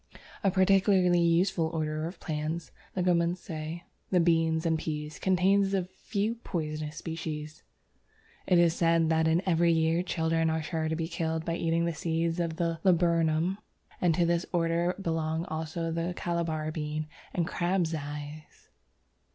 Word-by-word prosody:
A 195 Hz, -, +4 dB
particularly 190 Hz, -1 st, +4 dB
useful 170 Hz, 0 st, +2 dB
order 155 Hz, -1 st, -2 dB
of 175 Hz, -, -9 dB
plants 155 Hz, -1 st, -3 dB, 0.3 s
(Leguminosæ), 170 Hz, -2 st, -1 dB, 0.3 s
the 180 Hz, -, +3 dB
Beans 165 Hz, -1 st, +2 dB
and 160 Hz, -1 st, +2 dB
Peas, 150 Hz, -1 st, -4 dB
contains 195 Hz, +1 st, +3 dB
a 190 Hz, -, +1 dB
few 210 Hz, +4 st, -3 dB
poisonous 155 Hz, -3 st, -4 dB
species. 155 Hz, -2 st, -5 dB, 0.9 s
It 180 Hz, -, +5 dB
is 170 Hz, -1 st, +5 dB
said 165 Hz, -1 st, +2 dB
that 160 Hz, 0 st, +3 dB
in 165 Hz, +3 st, +2 dB
every 170 Hz, -2 st, +3 dB
year 165 Hz, +1 st, +2 dB
children 165 Hz, -2 st, 0 dB
are 160 Hz, 0 st, -1 dB
sure 160 Hz, 0 st, -2 dB
to 160 Hz, -, 0 dB
be 165 Hz, 0 st, -2 dB
killed 160 Hz, -1 st, -2 dB
by 165 Hz, -, -1 dB
eating 165 Hz, 0 st, +1 dB
the 170 Hz, -, -1 dB
seeds 165 Hz, +1 st, -1 dB
of 165 Hz, -2 st, -1 dB
the 165 Hz, -1 st, -1 dB
Laburnum, 170 Hz, 0 st, +2 dB, 0.4 s
and 170 Hz, -3 st, +3 dB
to 175 Hz, -, +3 dB
this 170 Hz, +1 st, 0 dB
order 170 Hz, 0 st, +1 dB
belong 160 Hz, -2 st, -1 dB
also 160 Hz, +1 st, -3 dB
the 165 Hz, +2 st, -2 dB
Calabar 165 Hz, -3 st, -2 dB
Bean 155 Hz, 0 st, -3 dB, 0.3 s
and 170 Hz, -, 0 dB
Crab's 175 Hz, -1 st, 0 dB
Eyes. 150 Hz, 0 st, -7 dB
165 Hz, 150 wpm, -29 LUFS, 160-175 Hz, 0.9 s, It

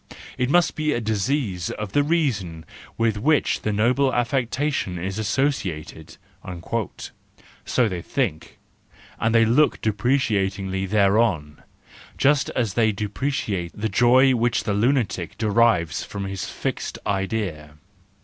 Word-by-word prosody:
It 125 Hz, 0 st, -1 dB
must 175 Hz, +3 st, +3 dB
be 155 Hz, -1 st, 0 dB
a -, -, -1 dB
disease 110 Hz, -, -1 dB
of 105 Hz, -2 st, -5 dB
the 145 Hz, -, +3 dB
reason 115 Hz, -, -1 dB, 0.3 s
with 115 Hz, -2 st, +1 dB
which 150 Hz, +6 st, +2 dB
the 105 Hz, -, -1 dB
noble 125 Hz, +6 st, +2 dB
affection 125 Hz, -4 st, -1 dB
is 95 Hz, +4 st, -4 dB
associated,"—so 100 Hz, -, -2 dB, 1.7 s
they 90 Hz, -4 st, -4 dB
think, 95 Hz, -, -3 dB, 0.6 s
and 115 Hz, +1 st, +1 dB
they 115 Hz, 0 st, +6 dB
look 135 Hz, +7 st, +3 dB
depreciatingly 100 Hz, -4 st, 0 dB
thereon; 100 Hz, -7 st, +1 dB, 0.6 s
just 140 Hz, +1 st, +3 dB
as 115 Hz, -6 st, 0 dB
they 110 Hz, -1 st, +3 dB
depreciate 105 Hz, -3 st, -3 dB
the 110 Hz, +1 st, -1 dB
joy 125 Hz, +6 st, +5 dB
which 120 Hz, 0 st, +1 dB
the 105 Hz, -, -1 dB
lunatic 110 Hz, -, 0 dB
derives 110 Hz, -7 st, +2 dB
from 100 Hz, -1 st, -6 dB
his 95 Hz, 0 st, -4 dB
fixed -, -, -4 dB
idea. 95 Hz, -7 st, -3 dB
110 Hz, 120 wpm, -23 LUFS, 95-130 Hz, 1.7 s, they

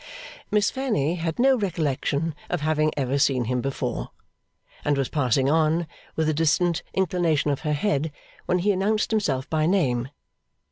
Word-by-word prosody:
Miss 210 Hz, -1 st, +2 dB
Fanny 220 Hz, -, 0 dB
had 165 Hz, -2 st, -3 dB
no 265 Hz, +2 st, +5 dB
recollection 160 Hz, -, -1 dB, 0.2 s
of 175 Hz, -3 st, -1 dB
having 155 Hz, 0 st, +1 dB
ever 135 Hz, 0 st, 0 dB
seen 130 Hz, -3 st, +2 dB
him 125 Hz, +1 st, -1 dB
before, 135 Hz, -, -3 dB, 0.7 s
and 145 Hz, -1 st, +1 dB
was 135 Hz, -2 st, 0 dB
passing 130 Hz, -2 st, +1 dB
on, 160 Hz, +3 st, +2 dB, 0.3 s
with 160 Hz, -1 st, 0 dB
a 155 Hz, -, +2 dB
distant 165 Hz, +2 st, +2 dB
inclination 170 Hz, -5 st, +1 dB
of 140 Hz, -, -1 dB
her 150 Hz, -2 st, -1 dB
head, 150 Hz, -1 st, 0 dB, 0.4 s
when 180 Hz, -, +2 dB
he 195 Hz, +4 st, +2 dB
announced 210 Hz, +3 st, 0 dB
himself 145 Hz, -12 st, 0 dB
by 155 Hz, -1 st, +1 dB
name. 130 Hz, -10 st, +1 dB
155 Hz, 155 wpm, -25 LUFS, 140-180 Hz, 0.7 s, no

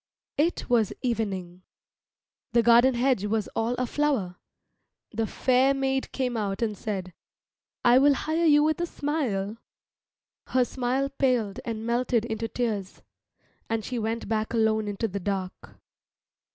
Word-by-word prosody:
It 330 Hz, +4 st, +1 dB
was 230 Hz, -5 st, +2 dB
evening. 195 Hz, -7 st, -2 dB, 0.9 s
The 235 Hz, -, +4 dB
garden 240 Hz, +2 st, +6 dB
hedge 245 Hz, -4 st, +1 dB
was 215 Hz, 0 st, 0 dB
all 230 Hz, +2 st, -1 dB
aflower. 250 Hz, -7 st, -1 dB, 0.7 s
The 225 Hz, 0 st, -1 dB
fair 260 Hz, +4 st, +2 dB
maid 270 Hz, 0 st, -1 dB
came 250 Hz, -2 st, -2 dB
out 205 Hz, -1 st, -2 dB
and 215 Hz, -2 st, -1 dB
said, 190 Hz, -3 st, -4 dB, 0.7 s
"I 245 Hz, +1 st, +7 dB
will 285 Hz, +1 st, +5 dB
hire 320 Hz, +5 st, 0 dB
you 295 Hz, -1 st, +6 dB
with 315 Hz, +2 st, +1 dB
a 345 Hz, -, 0 dB
smile." 235 Hz, -11 st, -2 dB, 0.9 s
Her 255 Hz, -1 st, +2 dB
smile 260 Hz, +2 st, -1 dB
paled 250 Hz, -7 st, 0 dB
and 225 Hz, -1 st, -4 dB
melted 235 Hz, -1 st, +1 dB
into 225 Hz, 0 st, -3 dB
tears, 215 Hz, -6 st, -3 dB, 0.7 s
and 225 Hz, -1 st, -1 dB
she 250 Hz, -2 st, -3 dB
went 225 Hz, +1 st, -2 dB
back 220 Hz, +1 st, -1 dB
alone 220 Hz, -1 st, +2 dB
into 205 Hz, +3 st, -2 dB
the 200 Hz, -1 st, -4 dB
dark. 190 Hz, -1 st, -5 dB
230 Hz, 140 wpm, -26 LUFS, 210-260 Hz, 0.9 s, I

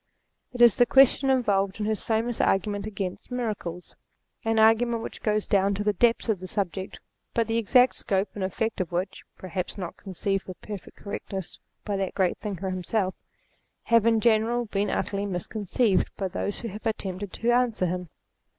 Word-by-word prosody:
It 245 Hz, -1 st, +3 dB
is 235 Hz, -4 st, +7 dB
the 245 Hz, -, +5 dB
question 270 Hz, +1 st, +5 dB
involved 200 Hz, -6 st, +2 dB
in 210 Hz, -, -1 dB
his 215 Hz, -2 st, -1 dB
famous 225 Hz, +1 st, 0 dB
argument 205 Hz, +1 st, +1 dB
against 195 Hz, +1 st, -5 dB
Miracles: 210 Hz, -8 st, -4 dB, 0.5 s
an 225 Hz, -1 st, +1 dB
argument 225 Hz, +1 st, +4 dB
which -, -, -7 dB
goes 215 Hz, -1 st, +1 dB
down 200 Hz, 0 st, +2 dB
to 205 Hz, -, -2 dB
the 210 Hz, 0 st, +2 dB
depths 235 Hz, +4 st, +2 dB
of 215 Hz, -5 st, +1 dB
the 185 Hz, -, -7 dB
subject, 190 Hz, 0 st, -3 dB, 0.4 s
but 230 Hz, -, +3 dB
the 225 Hz, 0 st, +1 dB
exact 250 Hz, +3 st, +5 dB
scope 195 Hz, +1 st, 0 dB
and 200 Hz, -, -4 dB
effect 220 Hz, +3 st, -1 dB
of 180 Hz, -, -4 dB
which, 185 Hz, +3 st, -2 dB, 0.2 s
(perhaps 185 Hz, +1 st, -4 dB
not 180 Hz, -3 st, -6 dB
conceived 195 Hz, 0 st, -2 dB
with 185 Hz, -, -9 dB
perfect 205 Hz, -3 st, -9 dB
correctness 195 Hz, -2 st, -6 dB, 0.3 s
by 205 Hz, -2 st, -1 dB
that 195 Hz, -1 st, -2 dB
great 190 Hz, -3 st, +1 dB
thinker 195 Hz, -3 st, -4 dB
himself), 185 Hz, +1 st, -1 dB, 0.7 s
have 230 Hz, -1 st, +4 dB
in 225 Hz, -1 st, +4 dB
general 235 Hz, +2 st, +2 dB
been 205 Hz, -1 st, -1 dB
utterly 200 Hz, 0 st, -1 dB
misconceived 200 Hz, +3 st, 0 dB
by 195 Hz, -, -1 dB
those 200 Hz, +2 st, -3 dB
who 230 Hz, -, -4 dB
have 210 Hz, +3 st, -5 dB
attempted 195 Hz, -3 st, -3 dB
to 235 Hz, +1 st, +1 dB
answer 240 Hz, -5 st, +2 dB
him. 180 Hz, -1 st, -3 dB
205 Hz, 180 wpm, -26 LUFS, 190-225 Hz, 0.7 s, is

